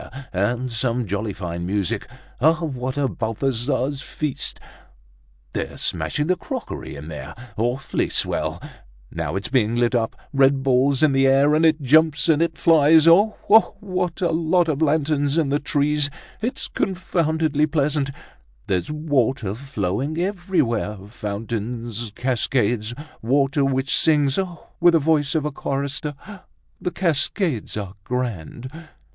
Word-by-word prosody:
And 120 +6 -1
some 120 +1 0
jolly 100 +2 -2
fine 85 -3 -5
music! 95 0 -2 0.3
What 145 -4 +1
a 140 -1 +2
Balthazar's 130 +4 -1
feast! 150 -4 -4 0.9
They're - - -4
smashing 150 - -1
the 185 +3 +2
crockery 180 - -6
in 70 +2 -9
there. 75 -4 -7 0.2
Awfully 120 +4 -1
swell! - - -1 0.5
Now 80 0 -3
it's 95 - -3
being 120 -4 +2
lit 120 0 +2
up; 115 -2 0 0.2
red 135 0 +4
balls 135 +2 +3
in 155 - +5
the 135 0 +3
air, 140 +2 +4
and 155 +2 +3
it 155 -2 +1
jumps, 150 +1 +4
and 155 -1 +4
it 170 - 0
flies! 160 0 +5
Oh! 200 +6 +6
oh! 220 +2 +5
what 185 -3 -3
a 175 -2 +2
lot 165 +2 +2
of 155 -1 -1
lanterns 145 -1 +1
in 155 -4 +2
the 145 +1 +1
trees! 145 0 +1 0.3
It's 240 +4 -2
confoundedly 160 -5 0
pleasant! 145 -2 0 0.6
There's 90 -3 -1
water 135 -8 0
flowing 130 - -3
everywhere, 175 - 0
fountains, 115 +1 -4
cascades, 120 -3 0 0.3
water 140 +4 +2
which 135 0 +1
sings, 145 -1 +3
oh! 180 -3 -4
with 175 0 +6
the 165 - +5
voice 150 0 +1
of 155 -2 +1
a 150 - -1
chorister. 140 +2 -3 0.7
The - - -1
cascades 165 - -1
are 100 -3 -5
grand!" 120 - -4
140 Hz, 135 wpm, -22 LUFS, 120-155 Hz, 0.9 s, Oh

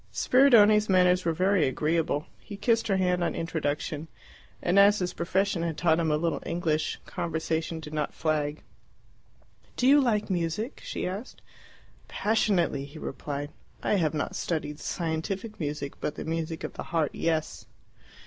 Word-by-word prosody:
Spiridione's 215 -6 +5
manners 180 -1 +4
were 165 - +2
very 185 0 +2
agreeable. 155 +2 0
He 205 - -9
kissed 230 +2 +1
her 195 -3 +2
hand 180 -1 +1
on - - -1
introduction, 155 -2 -2 0.5
and 180 +3 +3
as 205 +1 +6
his 180 -2 -2
profession 190 +1 0
had 165 -2 -2
taught 165 -2 +3
him 165 -1 +1
a 150 - +2
little 165 +2 -1
English, 165 -2 -1
conversation 160 0 -2
did 150 -1 -9
not 150 -1 -1
flag. 155 -1 -1 1.1
"Do 250 - +1
you 285 +2 +7
like 215 -5 +1
music?" 185 - -2
she - - -4
asked. 195 +7 -6 0.6
"Passionately," 200 -9 +1
he 145 +3 -12
replied. 145 -1 -5 0.3
"I - - +1
have 160 -4 +1
not 150 - -2
studied 155 -3 -3
scientific 185 +8 -3
music, 145 -2 -3
but 150 - -2
the - - -6
music 165 0 -3
of - - -5
the - - -6
heart, 160 -3 +1
yes." 160 -2 -2
170 Hz, 155 wpm, -27 LUFS, 155-195 Hz, 1.1 s, you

